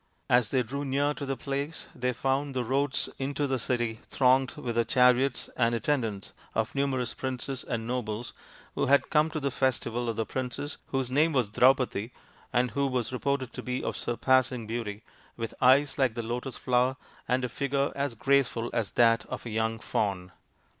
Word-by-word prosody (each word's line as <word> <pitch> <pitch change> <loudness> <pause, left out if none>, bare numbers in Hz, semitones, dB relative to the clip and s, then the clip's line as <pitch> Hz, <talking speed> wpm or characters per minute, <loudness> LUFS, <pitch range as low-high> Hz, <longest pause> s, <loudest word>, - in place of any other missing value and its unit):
As 120 -3 +4
they 130 -2 +2
drew 140 +5 -4
near 145 +2 +1
to 140 -1 -6
the 135 -1 -2
place 140 +5 -4
they 125 0 -1
found 135 +3 -1
the 125 - 0
roads 135 +3 0
into 140 +2 -1
the 135 -2 0
city 120 -2 -1
thronged 130 0 +3
with 125 -6 -4
the 115 0 +2
chariots 125 +1 +3
and 115 -1 +2
attendants 115 -7 -1 0.2
of 110 +2 0
numerous 135 -3 0
princes 130 0 -4
and 115 -2 -3
nobles 120 -2 -3 0.4
who - - 0
had 140 +1 +3
come 155 +1 +4
to 160 -1 -3
the 140 -1 -1
festival 120 -2 0
of 115 - -2
the 110 - -1
princess, 130 +4 -4
whose 135 -2 -1
name 155 +4 +3
was 125 -6 +2
Draupadi, 125 -2 +3 0.4
and 125 0 +2
who 140 0 +1
was 130 -2 -1
reported 130 -1 -1
to - - -5
be 125 0 -3
of - - -2
surpassing 125 0 +1
beauty, 110 -1 -4 0.3
with 115 -1 -4
eyes 135 +3 +5
like 130 -4 +2
the 120 - -3
lotus 120 +3 -4
flower, 125 +1 +1 0.3
and 125 0 +1
a - - -1
figure 140 +3 -1
as 140 -3 -2
graceful 125 -2 +1
as 110 -4 0
that 115 -1 +4
of - - -6
a 120 - -5
young 110 +1 0
fawn. 95 -4 -2
125 Hz, 185 wpm, -28 LUFS, 115-135 Hz, 0.4 s, eyes